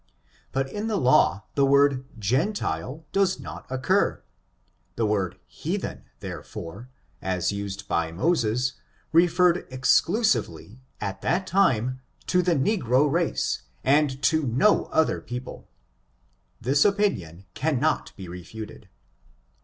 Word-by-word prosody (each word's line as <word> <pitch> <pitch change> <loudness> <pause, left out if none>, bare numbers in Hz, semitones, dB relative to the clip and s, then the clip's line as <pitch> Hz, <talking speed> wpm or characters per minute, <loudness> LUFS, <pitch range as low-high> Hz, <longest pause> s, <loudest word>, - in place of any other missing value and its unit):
But 135 0 0
in 210 +10 -4
the 215 -2 0
laio 105 - +4
the 140 - +2
word 140 -1 +4
gentile 130 - -1
does 195 -2 +2
not - - -9
occur. 130 -1 +1 0.7
The 115 - 0
word 100 -4 0
heathen^ - - -4 0.2
therefore, 100 +10 -8 0.3
as 95 -1 0
used 100 0 -5
by 85 -1 0
Moses, 125 - +1 0.4
referred 175 +1 +4
exclusively 130 - +1 0.2
at 100 - -4
that 185 +2 0
time 130 - +2 0.2
to 180 - +2
the 175 -1 +2
negro 140 - +2
race, 170 - 0 0.2
and 140 -1 +3
to 160 +4 +3
no 130 - +3
other 160 - +1
people: 125 +1 -7 0.9
this 140 +3 +3
opinion 120 - 0
cannot 155 +3 0
be 95 -3 -8
refuted. 95 +4 -9
130 Hz, 115 wpm, -25 LUFS, 105-170 Hz, 0.9 s, laio